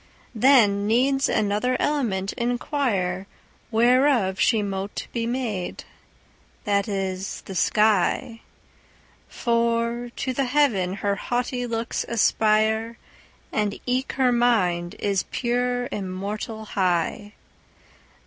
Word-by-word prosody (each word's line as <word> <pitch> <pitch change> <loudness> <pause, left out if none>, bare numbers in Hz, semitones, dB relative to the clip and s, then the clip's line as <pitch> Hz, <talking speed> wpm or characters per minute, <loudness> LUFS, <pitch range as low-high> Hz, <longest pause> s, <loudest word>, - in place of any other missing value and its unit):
Then 215 -5 +4
needs 270 +5 +2
another 215 +5 +1
element 215 -10 0
inquireWhereof 235 - 0
she 220 -3 +3
mote 195 0 -4
be 230 -1 -1
made—that 210 -2 -5
is, 195 -1 -3
the 195 - -9
sky; 215 +4 +1 0.9
For 235 0 0
to 260 - -2
the 275 +2 0
heaven 245 -10 +2
her 200 - +2
haughty 245 +2 -2
looks 230 0 -2
aspire, 220 0 +2 0.5
And 210 -2 -1
eke 255 +1 -1
her 260 -2 +2
mind 190 -8 +1
is 200 -2 0
pure 245 0 -1
immortal 205 +3 -5
high. 190 +2 -1
225 Hz, 90 wpm, -24 LUFS, 200-245 Hz, 0.9 s, Then